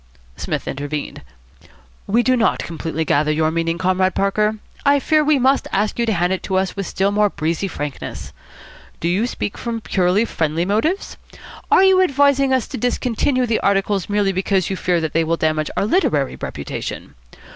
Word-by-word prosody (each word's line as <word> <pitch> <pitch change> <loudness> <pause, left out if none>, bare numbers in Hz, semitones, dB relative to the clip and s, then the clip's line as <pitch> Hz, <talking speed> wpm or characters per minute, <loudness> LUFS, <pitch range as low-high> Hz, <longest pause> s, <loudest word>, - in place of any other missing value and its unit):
Psmith - - -4
intervened. 145 +1 -4 0.9
"We 230 +4 +2
do 255 +2 +3
not 230 -3 +2
completely 160 -1 -4
gather 150 +1 +2
your 155 +1 +1
meaning, 165 0 -1
Comrade 185 +1 +1
Parker. 210 +2 +1 0.3
I 285 0 +4
fear 305 +2 +2
we 300 -1 +3
must 265 +2 +2
ask 210 +4 -1
you 235 - +1
to 220 - +2
hand 175 0 +1
it 190 - -3
to 190 - -3
us 190 0 -1
with 195 -2 -4
still 195 +1 0
more 210 0 +2
breezy 165 +3 -2
frankness. 150 -6 -6 0.7
Do 170 - -2
you 195 +7 +1
speak 205 - -4
from 235 -1 -3
purely 190 +1 +1
friendly 160 -3 -1
motives? 225 - -1 0.5
Are 375 - +5
you 380 -1 +5
advising 280 -4 +3
us 260 -3 +1
to - - -5
discontinue 250 +2 0
the 230 -2 0
articles 195 -1 0
merely 205 -1 +1
because 190 0 0
you - - -1
fear 180 -2 0
that 160 -2 -3
they 165 - +2
will 165 +1 0
damage 155 -1 0
our - - +1
literary 155 - +1
reputation? 70 - -6
195 Hz, 180 wpm, -20 LUFS, 165-235 Hz, 0.9 s, Are